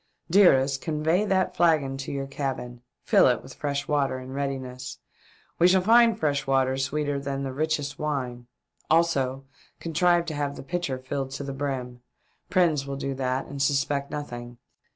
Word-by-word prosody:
Dearest, 135 -8 +5
convey 160 +5 +1
that 190 -2 +1
flagon 155 -6 +3
to 135 - -5
your 140 -1 -3
cabin. 135 -3 -4 0.2
Fill - - +5
it - - +1
with - - -11
fresh 140 -1 -3
water 140 -3 +1
in 130 0 -8
readiness. 130 -2 -4 0.6
We 175 - +6
shall 185 0 +4
find 230 +2 +5
fresh 145 -3 0
water 135 -1 +2
sweeter 145 +1 -1
than 140 0 -3
the 135 -1 -4
richest 150 -1 -2
wine. 125 -5 -3 0.4
Also 135 -5 +2 0.3
contrive 170 +1 +2
to 165 - -4
have 145 -1 -2
the - - -8
pitcher 170 -3 -2
filled 135 +1 -4
to 140 - -5
the 140 0 -5
brim. 130 -3 -4 0.5
Prins 160 -7 +2
will 140 0 -4
do 135 0 -3
that 130 0 -1
and 140 0 -6
suspect 140 0 +1
nothing. 120 -4 -6
140 Hz, 165 wpm, -26 LUFS, 135-155 Hz, 0.6 s, We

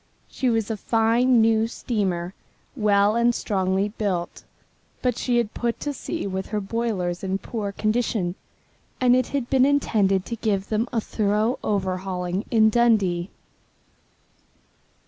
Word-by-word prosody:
She 255 - -1
was 225 -2 0
a 220 - -2
fine 230 +3 +3
new 225 0 +3
steamer, 190 -7 -2 0.4
well 210 -2 +3
and 235 0 +3
strongly 190 0 0
built, 195 -5 -3 0.6
but 250 -2 +1
she 245 0 0
had 235 -3 0
put 235 -1 -2
to 290 - -2
sea 330 +4 -5
with 190 -1 -3
her 210 - -2
boilers 195 -4 -2
in 190 0 -1
poor 205 -1 -4
condition, 215 -4 -1 0.7
and 250 -1 +4
it 255 -1 +1
had 275 -4 -2
been 265 -2 +4
intended 210 -9 +2
to 235 - -4
give 200 -3 -1
them 220 +2 0
a 230 - 0
thorough 215 +3 0
overhauling 185 -1 -2
in 220 -2 +4
Dundee. 205 -7 +2
215 Hz, 140 wpm, -24 LUFS, 195-235 Hz, 0.7 s, and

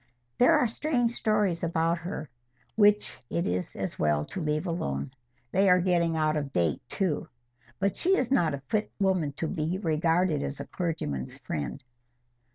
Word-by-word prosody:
"There 250 - +6
are 245 - +3
strange 245 -1 0
stories 210 -7 +1
about 165 0 +1
her, 170 -2 -5 0.5
which 210 -1 +4
it 170 - -1
is 90 0 -2
as - - -4
well 75 -1 +2
to 185 - -5
leave 150 +1 -1
alone. 130 - -2 0.4
They 195 +1 +4
are 180 0 +6
getting 170 -2 +2
out 155 0 +2
of 145 -2 -2
date 85 - +1
too. 180 -2 -1 0.5
But 195 0 0
she 380 +2 +3
is 255 - -1
not 165 - +3
a 140 - -10
fit 215 +6 -1
woman 185 -7 +1
to 160 - -3
be 160 +1 -1
regarded 165 -2 +1
as 140 - -4
the - - -6
clergyman's 155 - -3
friend. 80 - -5
170 Hz, 165 wpm, -28 LUFS, 150-195 Hz, 0.5 s, There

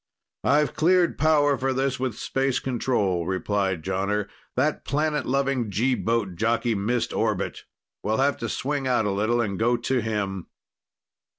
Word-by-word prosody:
"I've 150 +2 +3
cleared 175 +2 +3
power 145 -3 +3
for 135 0 0
this 135 0 -1
with 130 -4 -2
Space 135 -1 0
Control," 105 -9 0
replied 95 -2 -1
Jonner. 100 +3 -1 0.3
"That 145 +4 0
planet 150 0 0
loving 135 -3 0
G 115 +7 +1
boat 115 -7 -1
jockey 115 +3 +1
missed 110 +4 -1
orbit. - - -1 0.4
We'll 110 +1 0
have 140 +1 +2
to 115 - -4
swing 140 0 -2
out 120 -4 +2
a 100 - +1
little 110 +4 +1
and 100 -4 -2
go 120 +2 +3
to 130 0 0
him." 100 -4 -3
120 Hz, 155 wpm, -25 LUFS, 105-135 Hz, 0.4 s, I've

